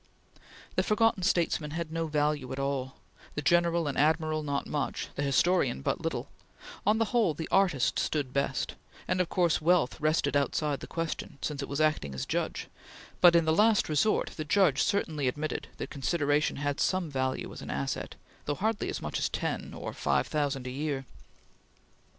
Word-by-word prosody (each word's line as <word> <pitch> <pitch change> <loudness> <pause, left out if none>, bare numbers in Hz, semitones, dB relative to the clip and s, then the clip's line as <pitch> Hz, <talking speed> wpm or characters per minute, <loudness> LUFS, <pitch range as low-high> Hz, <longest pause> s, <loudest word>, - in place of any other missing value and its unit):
The - - +5
forgotten 225 -1 +2
statesman 170 -4 +1
had 170 -2 -4
no 165 0 -1
value 150 -3 0
at 130 - -4
all; 135 -1 -2 0.4
the 150 - -1
general 170 0 +3
and 140 - -2
admiral 155 +1 +2
not 140 -2 -2
much; 145 -2 -3
the - - -4
historian 140 - +2
but - - -1
little; - - -3 0.6
on 210 +1 +5
the 225 - +2
whole, 220 -10 +3
the 160 - -4
artist 180 -10 +3
stood 140 -4 -1
best, 140 0 -1 0.3
and 185 - +2
of 180 - -2
course, 175 -5 +2
wealth 165 -4 +2
rested 155 -1 +1
outside 145 0 +1
the - - -8
question, 165 -4 -4
since 145 -1 -3
it 140 - -5
was 140 - -2
acting 150 - +1
as 65 - -3
judge; - - -2 0.5
but, 175 -1 +8
in 165 -1 +4
the 160 - +3
last 215 +4 +4
resort, 155 +8 +1
the 155 - -2
judge 155 -3 +3
certainly 155 -9 0
admitted 150 +4 -2
that - - -6
consideration 145 0 +1
had 145 0 -2
some 185 -4 0
value 130 -1 -2
as - - -9
an - - -8
asset, 70 0 -3 0.3
though 145 - -1
hardly 215 +4 -1
as - - -4
much - - -2
as - - 0
ten - - -3
or - - -6
five - - +1
thousand 145 -4 -1
a 125 - -4
year. 140 0 -3
150 Hz, 180 wpm, -29 LUFS, 140-170 Hz, 0.6 s, but